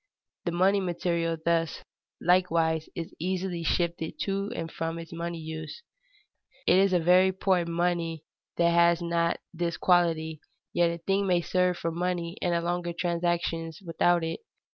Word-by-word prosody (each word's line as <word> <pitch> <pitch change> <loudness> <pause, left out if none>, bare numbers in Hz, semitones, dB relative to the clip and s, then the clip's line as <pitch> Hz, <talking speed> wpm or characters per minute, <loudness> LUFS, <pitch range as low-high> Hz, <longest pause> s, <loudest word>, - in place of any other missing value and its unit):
The 175 - 0
money 190 +4 +3
material 170 -2 -1
thus, 165 -1 0 0.4
likewise, 165 -3 +2
is 165 -1 -5
easily 180 0 -2
shifted 170 0 -1
to 195 +2 -1
and 165 0 -4
from 165 0 -3
its 165 0 -8
money 170 0 -4
use. 160 - -7 0.8
It 185 - +5
is 195 0 +4
a 180 - +4
very 180 +3 +5
poor 190 -2 +1
money 170 -2 -1 0.3
that 170 0 +4
has 170 0 +4
not 170 0 +1 0.2
this 170 0 -2
quality, 160 -3 +2 0.3
yet 175 0 +3
a 170 - -3
thing 195 +4 0
may 175 -2 +3
serve 180 0 +1
for 165 - -2
money 175 0 -2
in 175 - +1
larger 175 0 -2
transactions 170 -1 -1
without 170 +1 +2
it. 165 - -3
170 Hz, 150 wpm, -28 LUFS, 165-180 Hz, 0.8 s, It